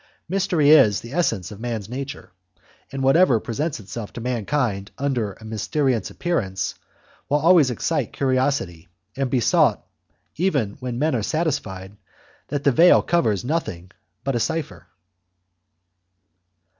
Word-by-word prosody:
Mystery 175 -5 +2
is 110 -10 +6
the 120 +3 -10
essence 115 - 0
of 105 - -10
man's 115 -4 -4
nature, 135 +1 -7 0.6
and 135 0 -4
whatever 135 -2 +4
presents 145 +8 -3
itself 105 +1 -7
to - - -7
mankind 115 -3 -1
under 125 -7 -1
a 110 - -15
mysterious 110 +2 -1
appearance 95 - -2 0.6
will 145 - +3
always 160 -2 +5
excite 140 +7 -1
curiosity 130 - -1 0.3
and 135 -1 -1
be 125 - +1
sought, 115 - +2 0.5
even 145 - +1
when 125 -3 -4
men 155 +4 +1
are 120 - 0
satisfied 105 - -3 0.5
that 145 0 -3
the 140 - +4
veil 170 +7 +6
covers 110 - +1
nothing 95 - -3 0.3
but 135 -2 -1
a - - +1
cypher. 160 +5 -3
130 Hz, 130 wpm, -22 LUFS, 105-150 Hz, 0.6 s, is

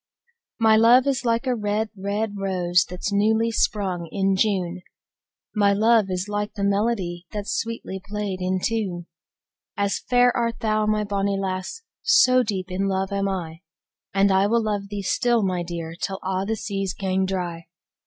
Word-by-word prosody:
My 220 -1 +5
luve 240 +4 +6
is 270 -3 0
like 230 +2 +1
a 255 - +1
red, 215 -1 -1
red 205 +2 -2
rose, 180 -3 +1
That's 180 +3 -4
newly 220 +3 +2
sprung 185 -6 -1
in 195 -1 +1
June: 185 -3 0 0.7
My 200 -2 +3
luve 220 -1 +4
is 185 +1 -2
like 205 0 -3
the 200 - -3
melodic, 200 -4 0
That 205 -1 -4
's - - -2
sweetly 225 -4 -5
play'd 200 -2 -4
in 185 +1 0
tune. 195 -7 -2 0.7
As 200 0 0
fair 245 0 +4
art 235 -1 -1
thou, 215 -1 +1
my 215 0 +1
bonie 200 -1 -1
lass, 190 - -4 0.2
So 460 - +5
deep 195 -5 -3
in 195 +2 -1
luve 190 0 -1
am 200 0 0
I, 165 -4 -5 0.5
And 195 0 +3
I 190 +1 +4
will 230 +2 +2
luve 205 -2 -2
thee 205 -1 -4
still, 235 +3 +2
my 185 -2 0
dear, 170 -1 -5
Till 195 - -2
a' 190 0 -1
the 225 - 0
seas 195 -3 -3
gang 190 -1 0
dry. 175 -3 -4
200 Hz, 175 wpm, -23 LUFS, 190-220 Hz, 0.7 s, luve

